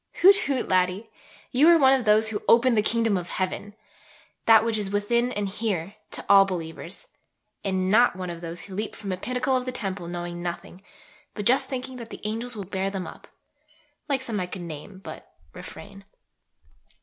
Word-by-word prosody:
Hoot, 390 +2 +9
hoot, 265 -3 0
laddie! 185 +4 +1 0.4
you 275 +6 +5
are 340 0 +8
one 265 -3 +6
of 260 -3 +1
those 215 +1 +4
who 210 -2 -3
"open 240 +2 +5
the 215 - +4
Kingdom 225 -1 +1
of 175 -1 -5
heaven" 195 +2 -3 0.7
that 225 -1 +7
which 225 -2 0
is 200 -2 -2
"within" 235 +5 +1
and 205 -3 -2
here 195 -3 -3 0.2
"to - - -5
all 195 0 +8
believers"; 175 - -5 0.6
and 190 -2 0
not 225 +2 +5
one 180 -1 -4
of 170 0 -8
those 170 0 -5
who 195 - -10
leap 210 +3 -4
from 200 -2 -6
a 185 - -2
pinnacle 250 +5 -1
of 250 -1 0
the 255 - -2
temple 195 -7 -4
knowing 175 0 -5
nothing, 175 +1 -6 0.5
but 205 - -4
just 265 +3 +3
thinking 260 -1 -5
that 235 -2 -8
the - - -9
"angels 225 +3 -3
will 205 - -5
bear 190 +1 -2
them 195 -2 -4
up" 160 - -11 0.8
like 270 -2 0
some 225 -5 -3
I 180 - -2
could 180 0 -7
name 170 +4 -8
but - - -10 0.2
refrain. 200 -1 -10
205 Hz, 195 wpm, -25 LUFS, 185-240 Hz, 0.8 s, Hoot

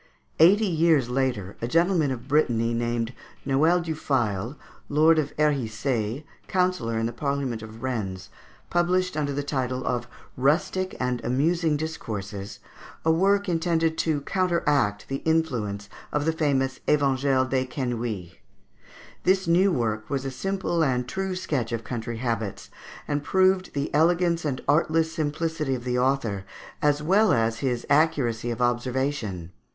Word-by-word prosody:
Eighty 195 +7 +6
years 160 - +3
later 125 -7 -1
a 115 - -1
gentleman 165 +1 +2
of 130 -1 -5
Brittany, 120 -6 +2
named 120 0 -1 0.3
Noel 155 +6 +3
du 165 -1 -3
Fail, 120 -4 -1 0.3
Lord 155 +2 +5
of 145 -2 -1
Herissaye, 125 -3 0 0.2
councillor 180 - 0
in 115 - 0
the 115 - -3
Parliament 140 -5 -2
of 110 +2 -10
Rennes, 100 -8 -3 0.4
published, 180 +1 +1
under 145 -2 -1
the 145 +1 -2
title 130 -3 -2
of 120 -1 -1 0.3
"Rustic 170 +7 +1
and 125 -1 -1
Amusing 155 +5 +1
Discourses," 105 -10 -5 0.5
a 160 - +5
work 200 +4 +3
intended 165 -2 +1
to 155 -3 +1
counteract 145 - +1
the 135 - -2
influence 125 -12 -1 0.2
of 150 0 0
the 160 - +2
famous 135 -4 0
"Evangile 135 -2 +2
des 130 0 0
Quenouilles." 120 - -4 0.8
This 190 +1 +2
new 180 +4 +4
work 110 -7 -1
was 135 -1 -2
a 135 - -2
simple 175 +4 -1
and 125 -3 0
true 190 +4 -3
sketch 135 -10 -2
of 115 -1 -3
country 120 0 -4
habits, 115 -3 -3 0.4
and 145 0 -1
proved 185 0 +2
the 140 0 -2
elegance 170 +2 +2
and 135 -3 -2
artless 160 +2 +2
simplicity 155 -2 -1
of 120 - -6
the 125 0 0
author, 125 -7 0 0.4
as 150 0 +2
well 195 +5 +4
as 115 0 +1
his 125 -2 -1
accuracy 135 -6 +2
of 120 +1 -1
observation. 120 - -1
140 Hz, 145 wpm, -25 LUFS, 120-160 Hz, 0.8 s, Eighty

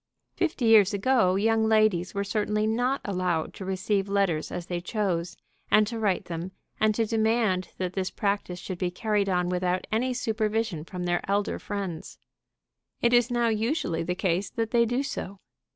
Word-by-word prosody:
Fifty 320 -8 -1
years 215 -3 +6
ago 200 -3 +3
young 220 +2 +2
ladies 215 -5 +2
were 200 - 0
certainly 210 +1 0
not 245 +5 0
allowed 180 -5 -1
to - - -8
receive 195 +1 -1
letters 195 -6 0
as 175 -1 -4
they 175 -1 -3
chose, 180 -4 -2 0.3
and 215 - +5
to 230 +2 -5
write 205 -4 0
them, 175 +2 -5 0.3
and 215 -1 +3
to 225 - +1
demand 220 -4 +1
that 185 -1 -3
this 190 -1 -1
practice 200 -3 -2
should 180 0 -6
be 180 - 0
carried 205 +2 0
on 180 -1 +1
without 180 0 0
any 240 +4 +1
supervision 220 -6 -1
from 180 0 -6
their 175 0 0
elder 200 +1 0
friends. 195 -6 -5 0.8
It 235 0 +2
is 240 0 +4
now 240 -1 +1
usually 225 - 0
the 180 +2 -2
case 190 +1 0
that 225 -1 -3
they 235 -1 +4
do 245 +4 0
so. 200 -7 -5
200 Hz, 175 wpm, -27 LUFS, 180-225 Hz, 0.8 s, years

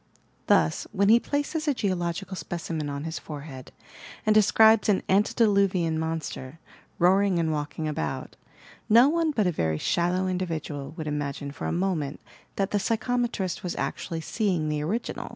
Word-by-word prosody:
Thus, 80 - +2
when 200 +1 +2
he 230 +2 +7
places 290 +4 -2
a 290 - +2
geological 185 -2 -2
specimen 165 -4 -4
on 140 0 -4
his 160 0 -4
forehead 140 -3 -9 0.5
and 215 - +4
describes 220 +1 +5
an 195 - +2
"antediluvian 195 -5 +2
monster," 160 -3 -4 0.4
roaring 190 +1 +3
and 165 -1 +1
walking 150 +1 -3
about, 75 - -4 0.5
no 235 +4 +7
one 330 0 +1
but 225 -9 +1
a 180 - +2
very 80 - -1
shallow 175 - 0
individual 160 -6 -4
would 160 - -4
imagine 145 -1 -3
for - - -5
a - - -1
moment 170 -6 -1 0.4
that 195 0 -1
the 205 - +1
psychometrist 230 -4 -1
was 180 -3 -4
actually 165 -1 -3
seeing 180 -5 -1
the 150 -1 -1
original 200 +11 -3
180 Hz, 150 wpm, -26 LUFS, 155-210 Hz, 0.5 s, he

